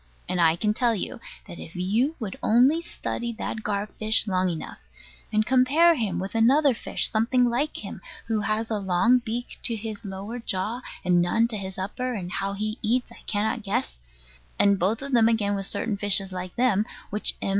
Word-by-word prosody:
And 180 -1 0
I 165 -1 +5
can 210 +4 0
tell 235 0 +2
you, 200 - -4 0.3
that 175 - -9
if 160 - -10
you 220 - +1
would 210 -6 -4
only 260 +9 +4
study 235 -7 -4
that 220 0 -4
gar 205 -1 -1
fish 215 +1 0
long 185 -2 +1
enough, 165 -2 -6 0.5
and 215 0 +2
compare 265 +8 +5
him 225 - -1
with 190 +2 -4
another 265 +5 +4
fish 230 - 0
something 240 +2 +2
like 280 +6 -2
him, - - -7 0.2
who 225 -2 0
has 215 +2 -1
a 215 - 0
long 200 +6 +3
beak 240 +1 -5
to 230 - -1
his 220 0 -6
lower 200 +4 -6
jaw, 220 +2 -2 0.2
and 175 -1 +4
none 225 +7 +2
to 225 - -3
his 190 -2 -6
upper 245 +6 -3
and 180 -4 -5
how 195 +1 -2
he 215 +3 -3
eats 240 +3 0
I - - -14
cannot 220 +2 0
guess, 60 - -2 0.6
and 200 -1 +4
both 210 +8 +1
of 280 - -5
them 230 -3 +5
again 210 -3 +1
with 195 -1 -1
certain 215 -3 -2
fishes 195 -1 +1
like 185 -1 -6
them, 235 -5 +3 0.3
which 210 +1 +3
M. - - -2
215 Hz, 200 wpm, -25 LUFS, 195-240 Hz, 0.6 s, I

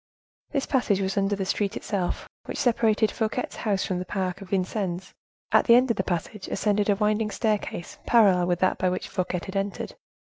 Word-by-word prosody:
This 280 -3 -1
passage 245 -8 +1
was 190 0 -1
under 200 0 +1
the 195 -1 -2
street 200 +1 -1
itself, 190 -4 -2 0.2
which - - -5
separated 220 -3 +2
Fouquet's 220 +3 -2
house 200 -3 0
from 180 -2 -2
the 180 - -4
Park 190 0 -3
of 195 - -10
Vincennes. 190 -1 -2 0.4
At - - +5
the 235 - +7
end 250 0 +4
of 225 - -1
the 190 - +1
passage 190 +3 -3
ascended 210 0 +1
a 205 - +5
winding 210 +1 +1
staircase 210 -5 -2
parallel 195 -7 +5
with 175 -1 +1
that 185 - +2
by 185 - +2
which 185 - -3
Fouquet 180 -2 -2
had 190 - -7
entered. 195 0 -2
200 Hz, 195 wpm, -26 LUFS, 185-215 Hz, 0.4 s, the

